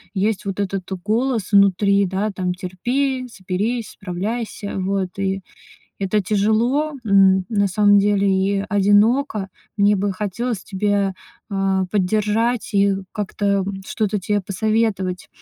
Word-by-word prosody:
есть 205 Hz, +1 st, 0 dB
вот 195 Hz, 0 st, -4 dB
этот 195 Hz, -2 st, -3 dB
голос 225 Hz, -1 st, 0 dB
внутри, 200 Hz, 0 st, +4 dB
да, 200 Hz, +3 st, -1 dB
там, 180 Hz, -2 st, -2 dB
терпи, 250 Hz, +9 st, -2 dB
соберись, 210 Hz, +4 st, -3 dB
справляйся. 205 Hz, +3 st, -4 dB
Вот. 190 Hz, 0 st, -2 dB
И 195 Hz, 0 st, -1 dB, 0.6 s
это 200 Hz, +1 st, 0 dB
тяжело, 225 Hz, +10 st, +1 dB
м, 190 Hz, -2 st, +4 dB
на 200 Hz, -3 st, +2 dB
самом 205 Hz, +1 st, +4 dB
деле 200 Hz, 0 st, +2 dB
и 195 Hz, +1 st, +1 dB
одиноко. 205 Hz, +2 st, +2 dB, 0.3 s
Мне 205 Hz, 0 st, +4 dB
бы 200 Hz, +1 st, 0 dB
хотелось 210 Hz, +3 st, -3 dB
тебя, 200 Hz, -1 st, 0 dB, 0.4 s
э, 195 Hz, -1 st, +1 dB
поддержать 215 Hz, +4 st, 0 dB
и 200 Hz, 0 st, +3 dB, 0.2 s
как-то, 205 Hz, 0 st, -3 dB, 0.2 s
м, 195 Hz, -1 st, -5 dB
что-то 210 Hz, -1 st, -1 dB
тебе 205 Hz, +2 st, 0 dB
посоветовать. 195 Hz, -1 st, -1 dB
200 Hz, 125 wpm, -21 LUFS, 190-215 Hz, 0.6 s, внутри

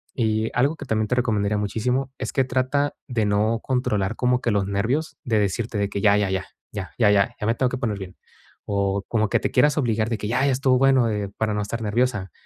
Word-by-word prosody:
Y 110 Hz, -2 st, 0 dB
algo 135 Hz, +6 st, +2 dB
que 150 Hz, -, -9 dB
también 110 Hz, -3 st, 0 dB
te -, -, -1 dB
recomendaría 105 Hz, -4 st, +1 dB
muchísimo, 125 Hz, +6 st, -1 dB
es -, -, -5 dB
que 135 Hz, -, +3 dB
trata 130 Hz, +3 st, 0 dB
de 120 Hz, -5 st, 0 dB
no 105 Hz, +3 st, +1 dB
controlar 110 Hz, -5 st, 0 dB
como 125 Hz, 0 st, +1 dB
que 120 Hz, -, 0 dB
los 100 Hz, -2 st, +1 dB
nervios, 130 Hz, +10 st, -1 dB
de 115 Hz, -3 st, +1 dB
decirte 105 Hz, +3 st, -1 dB
de 100 Hz, 0 st, +1 dB
que 100 Hz, -, -3 dB
ya, 100 Hz, 0 st, +5 dB
ya, 100 Hz, -2 st, 0 dB
ya, 95 Hz, 0 st, -2 dB, 0.3 s
ya, 100 Hz, -3 st, -5 dB
ya, 110 Hz, -4 st, +4 dB, 0.3 s
ya -, -, -3 dB
me 115 Hz, -, +3 dB
tengo 130 Hz, +1 st, +1 dB
que 130 Hz, -, -3 dB
poner 115 Hz, -5 st, -2 dB
bien, 95 Hz, -2 st, -9 dB, 0.5 s
o 100 Hz, -1 st, 0 dB
como 110 Hz, -3 st, 0 dB
que -, -, +2 dB
te -, -, -2 dB
quieras 150 Hz, +1 st, +3 dB
obligar 115 Hz, -5 st, +1 dB
de 115 Hz, -, -1 dB
que: 105 Hz, -, -4 dB
"Ya, 125 Hz, +4 st, +1 dB
ya 140 Hz, -, +3 dB
estuvo 130 Hz, 0 st, +2 dB
bueno", 135 Hz, -3 st, +4 dB
eh, 105 Hz, -2 st, -2 dB
para 110 Hz, -1 st, 0 dB
no 105 Hz, -, -1 dB
estar 110 Hz, +3 st, -4 dB
nerviosa. 105 Hz, -2 st, 0 dB
110 Hz, 235 wpm, -23 LUFS, 105-125 Hz, 0.5 s, ya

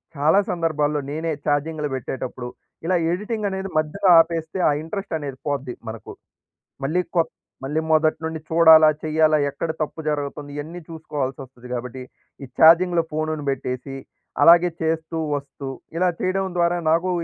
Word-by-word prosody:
చాలా 155 Hz, +7 st, +4 dB
సందర్భాల్లో 150 Hz, -4 st, 0 dB
నేనే 160 Hz, +2 st, -2 dB
చార్జింగ్‌లు 150 Hz, +1 st, 0 dB
బెట్టేటప్పుడు, 130 Hz, -1 st, -5 dB, 0.4 s
ఇలా 180 Hz, +2 st, +2 dB, 0.2 s
ఎడిటింగనేది 200 Hz, 0 st, -3 dB
మధ్యలో 180 Hz, +6 st, +1 dB
ఆపేస్తే 165 Hz, +2 st, 0 dB
ఆ -, -, +3 dB
ఇంట్రెస్టనేది 160 Hz, -6 st, -5 dB
పోద్ది 140 Hz, -3 st, -2 dB, 0.2 s
మనకు. 110 Hz, 0 st, -8 dB, 0.7 s
మళ్ళీ 175 Hz, +6 st, +1 dB
కొత్ 165 Hz, -1 st, +2 dB, 0.3 s
మళ్ళీ 150 Hz, +4 st, -1 dB
మొదటినుండి 160 Hz, 0 st, +1 dB
చూడాలా, 160 Hz, -1 st, +7 dB, 0.2 s
చెయ్యాలా, 155 Hz, 0 st, +3 dB
ఎక్కడ 160 Hz, +3 st, -4 dB
తప్పు 155 Hz, +1 st, -4 dB
జరుగుతుంది 145 Hz, -1 st, -3 dB
ఇయన్నీ 160 Hz, +4 st, -6 dB
చూసుకోవాల్సొస్తది 135 Hz, -5 st, -6 dB
కాబట్టి, 125 Hz, +1 st, -5 dB, 0.4 s
ఈ -, -, -8 dB
చార్జింగ్‌లో 170 Hz, +1 st, +6 dB
ఫోన్‌ని 155 Hz, -1 st, -2 dB
బెట్టేసి 135 Hz, 0 st, -4 dB, 0.5 s
అలాగే 170 Hz, +2 st, +7 dB
చేస్తూ, 160 Hz, 0 st, -1 dB, 0.2 s
వస్తూ 140 Hz, 0 st, -8 dB, 0.3 s
ఇలా 180 Hz, +2 st, +2 dB
చేయడం 190 Hz, +1 st, 0 dB
ద్వారా 175 Hz, 0 st, +2 dB
నాకూ 170 Hz, +3 st, +2 dB
155 Hz, 125 wpm, -22 LUFS, 145-170 Hz, 0.7 s, చూడాలా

